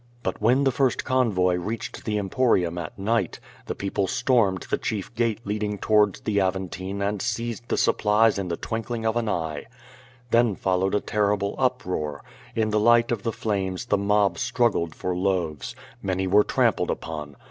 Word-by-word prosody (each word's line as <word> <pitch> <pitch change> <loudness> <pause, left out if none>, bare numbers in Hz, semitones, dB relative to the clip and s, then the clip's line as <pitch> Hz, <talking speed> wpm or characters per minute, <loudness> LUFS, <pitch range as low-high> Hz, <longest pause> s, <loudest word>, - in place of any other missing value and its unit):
But - - -3
when 125 +6 +4
the 135 - +3
first 130 -1 +1
convoy 100 -9 +2
reached 110 +6 -5
the 105 -1 0
Emporium 95 -5 +1
at 80 - -7
night, 100 -1 0 0.3
the - - -3
people 100 0 -1
stormed 100 -3 +2
the - - +1
chief 105 0 -3
gate 115 -2 0
leading 105 0 -2
towards 105 -1 +2
the 100 -2 +1
Aventine 95 +1 -2
and 100 0 -1
seized 120 0 -3
the - - +1
supplies 105 0 +3
in 95 - -3
the 85 -1 -2
twinkling 115 0 -4
of 110 0 +1
an 115 -2 0
eye. 80 -5 -2 0.7
Then 115 -3 +4
followed 95 +2 0
a 105 - +1
terrible 100 -1 0
uproar. 90 - -1 0.3
In 110 -1 +1
the 105 - +2
light 120 +2 +4
of 115 -4 -1
the 115 - -1
flames 95 -2 -2
the 105 -4 +2
mob 100 0 +2
struggled 120 -9 +1
for 90 -1 -2
loaves. 90 -5 -1 0.3
Many 95 -1 -1
were 100 +3 +5
trampled - - +1
upon. 75 -3 -5
105 Hz, 170 wpm, -25 LUFS, 95-115 Hz, 0.7 s, were